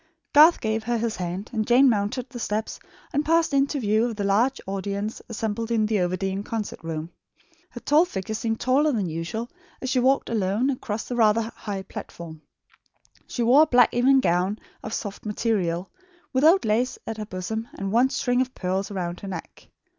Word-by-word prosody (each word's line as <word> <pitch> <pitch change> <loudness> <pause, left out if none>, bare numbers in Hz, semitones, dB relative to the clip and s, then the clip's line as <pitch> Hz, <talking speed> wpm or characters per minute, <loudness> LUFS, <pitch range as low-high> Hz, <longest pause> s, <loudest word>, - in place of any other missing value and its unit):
Garth 310 +4 +7
gave 220 0 -1
her 240 0 0
his 230 -1 -2
hand, 180 +3 -4
and 220 -2 -1
Jane 255 +3 +6
mounted 225 +2 0
the 245 -2 -9
steps 215 0 -3 0.3
and 290 - +1
passed 325 -1 +2
into 280 +1 +2
view 220 0 +2
of 235 -2 -3
the 205 - -3
large 220 +7 +2
audience 200 +2 -3
assembled 225 0 -3
in 225 -2 +2
the 215 -1 +1
Overdene 190 +2 -1
concert 220 -1 -4
room. 165 0 -5 0.6
Her - - -9
tall 310 +4 +4
figure 195 - -5
seemed 225 0 -2
taller 280 +4 +3
than 215 -7 0
usual 165 +8 -4 0.3
as 260 - -3
she 255 - +2
walked 265 +2 +2
alone 215 +5 +1
across 220 -4 -4
the 245 - -3
rather 225 0 +3
high 200 -3 -5
platform. 165 -4 -9 0.9
She 240 - -2
wore 255 +6 +6
a 315 - +5
black 245 -4 +4
evening 265 +3 +4
gown 180 +1 +1 0.2
of 220 - -6
soft 205 -2 -6
material, 195 -5 -1 0.4
with 260 +1 +1
old 335 +1 +5
lace 230 +4 +1
at 225 - -5
her 215 - -4
bosom 220 +4 -4
and 195 0 -4
one 245 +4 +4
string 245 -1 +1
of 255 0 -3
pearls 190 +1 -2
round 180 -3 -4
her 200 - -8
neck. 180 -4 -8
220 Hz, 190 wpm, -25 LUFS, 195-250 Hz, 0.9 s, Garth